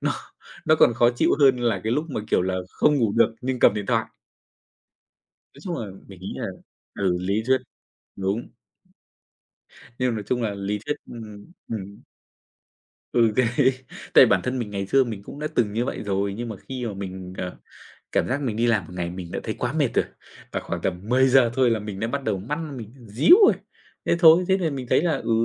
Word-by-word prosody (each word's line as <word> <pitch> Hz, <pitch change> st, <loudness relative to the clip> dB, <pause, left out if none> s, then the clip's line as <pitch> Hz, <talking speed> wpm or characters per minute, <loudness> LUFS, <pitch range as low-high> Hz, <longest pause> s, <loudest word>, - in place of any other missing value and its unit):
nó -, -, 0 dB, 0.5 s
nó 155 Hz, -, +6 dB
còn 120 Hz, -, +5 dB
khó 120 Hz, +1 st, +4 dB
chịu -, -, +2 dB
hơn 135 Hz, -2 st, +6 dB
là 115 Hz, -5 st, 0 dB
cái 110 Hz, -, 0 dB
lúc 150 Hz, +4 st, 0 dB
mà, 110 Hz, -, -2 dB
kiểu -, -, +3 dB
là, 95 Hz, 0 st, -1 dB, 0.2 s
không 150 Hz, -1 st, +2 dB
ngủ 115 Hz, -6 st, +1 dB
được 115 Hz, -1 st, +4 dB
nhưng 130 Hz, 0 st, -2 dB
cầm 105 Hz, -, +5 dB
điện 105 Hz, -2 st, -4 dB
thoại. -, -, +1 dB, 1.5 s
Nói 140 Hz, -, -15 dB
chung 175 Hz, -3 st, -3 dB
là 110 Hz, -, -4 dB, 0.2 s
mình 95 Hz, -2 st, -13 dB
nghĩ 95 Hz, -, -6 dB
là -, -, -3 dB, 0.5 s
ừ, 95 Hz, -3 st, 0 dB
lý 100 Hz, +4 st, 0 dB
thuyết, 130 Hz, 0 st, +4 dB, 0.6 s
đúng. 100 Hz, +4 st, -2 dB, 1.5 s
Nên 125 Hz, -2 st, +1 dB
nói 105 Hz, -, -3 dB
chung 125 Hz, -1 st, 0 dB
là 105 Hz, -3 st, -1 dB
lý 100 Hz, +1 st, -3 dB
thuyết 150 Hz, -, -1 dB
ừm, 110 Hz, +5 st, -10 dB, 0.2 s
ừm. 100 Hz, -2 st, -6 dB, 1.1 s
Ừ, 115 Hz, -3 st, +4 dB
đấy. 125 Hz, +2 st, +3 dB, 0.4 s
Tại -, -, +9 dB
bản -, -, +3 dB
thân 130 Hz, 0 st, -2 dB
mình 110 Hz, -4 st, -4 dB
ngày 100 Hz, -1 st, -3 dB
xưa 135 Hz, +6 st, +4 dB
mình 110 Hz, -4 st, -6 dB
cũng 140 Hz, -, -10 dB
đã 150 Hz, -, -3 dB
từng 110 Hz, -4 st, +1 dB
như 115 Hz, +3 st, 0 dB
vậy -, -, -4 dB
rồi, 100 Hz, 0 st, -1 dB
nhưng 120 Hz, +2 st, -5 dB
mà 110 Hz, -, -6 dB
khi 125 Hz, +3 st, -6 dB
mà 105 Hz, -, -4 dB
mình, 95 Hz, -1 st, -7 dB
à, 90 Hz, -1 st, -4 dB, 0.6 s
cảm -, -, +1 dB
giác 130 Hz, +3 st, -1 dB
mình 115 Hz, -6 st, -2 dB
đi 120 Hz, -, +2 dB
làm 110 Hz, -6 st, +2 dB
một 90 Hz, -, -12 dB
ngày 85 Hz, -1 st, -2 dB
mình 90 Hz, -1 st, -7 dB
đã -, -, -3 dB
thấy 110 Hz, -, -3 dB
quá 125 Hz, 0 st, -2 dB
mệt 145 Hz, -4 st, +2 dB
rồi -, -, +3 dB, 0.5 s
và -, -, -1 dB
khoảng -, -, -5 dB
tầm 90 Hz, -1 st, -2 dB
10:00 130 Hz, 0 st, +5 dB
thôi 130 Hz, -2 st, +3 dB
là 115 Hz, -, +1 dB
mình 105 Hz, -2 st, -6 dB
đã 115 Hz, -, 0 dB
bắt 140 Hz, +2 st, -3 dB
đầu 95 Hz, -, 0 dB
mắt 145 Hz, -, -4 dB, 0.2 s
mình 115 Hz, 0 st, -9 dB
díu 125 Hz, -, +6 dB
rồi. -, -, +6 dB, 0.5 s
Thế -, -, +2 dB
thôi, 170 Hz, +1 st, +7 dB
thế 190 Hz, -, +3 dB
là 170 Hz, -4 st, 0 dB
mình 130 Hz, -3 st, -5 dB
thấy -, -, +4 dB
là, 170 Hz, -2 st, +1 dB
ừ, 115 Hz, -, -4 dB
115 Hz, 220 wpm, -24 LUFS, 100-130 Hz, 1.5 s, Tại